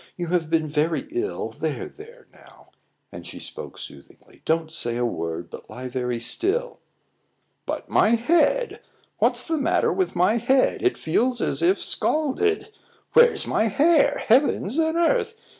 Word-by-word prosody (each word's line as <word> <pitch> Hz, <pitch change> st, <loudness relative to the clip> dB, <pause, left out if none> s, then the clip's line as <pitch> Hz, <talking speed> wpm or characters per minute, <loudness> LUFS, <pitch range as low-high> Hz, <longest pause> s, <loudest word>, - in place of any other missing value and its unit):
"You 175 Hz, -2 st, -4 dB
have 170 Hz, -3 st, 0 dB
been 160 Hz, -1 st, +1 dB
very 155 Hz, -, -1 dB
ill; 365 Hz, +4 st, -3 dB
there, -, -, -4 dB
there, 465 Hz, +4 st, -15 dB
now!" -, -, -20 dB, 0.4 s
And -, -, -9 dB
she -, -, -9 dB
spoke -, -, -9 dB
soothingly. -, -, -13 dB
"Don't 160 Hz, 0 st, 0 dB
say 120 Hz, -7 st, -2 dB
a 120 Hz, -, 0 dB
word, 85 Hz, -4 st, -4 dB
but -, -, -11 dB
lie 125 Hz, +1 st, -7 dB
very 125 Hz, -1 st, -3 dB
still." 390 Hz, -, -2 dB, 0.9 s
"But -, -, -4 dB
my 225 Hz, +2 st, +3 dB
head! 340 Hz, -, +1 dB, 0.4 s
What's -, -, +2 dB
the 320 Hz, -2 st, -2 dB
matter 275 Hz, -, +1 dB
with 375 Hz, -, -1 dB
my 185 Hz, +6 st, +3 dB
head? 260 Hz, +3 st, +2 dB
It 370 Hz, -, +1 dB
feels 240 Hz, +10 st, 0 dB
as -, -, 0 dB
if 365 Hz, +3 st, +2 dB
scalded. 405 Hz, +9 st, 0 dB, 0.4 s
Where's 475 Hz, 0 st, +5 dB
my 220 Hz, -, +1 dB
hair? 290 Hz, -, +3 dB
Heavens 250 Hz, 0 st, +2 dB
and 320 Hz, +1 st, +1 dB
earth! 445 Hz, +6 st, +1 dB
250 Hz, 155 wpm, -23 LUFS, -, 0.9 s, Where's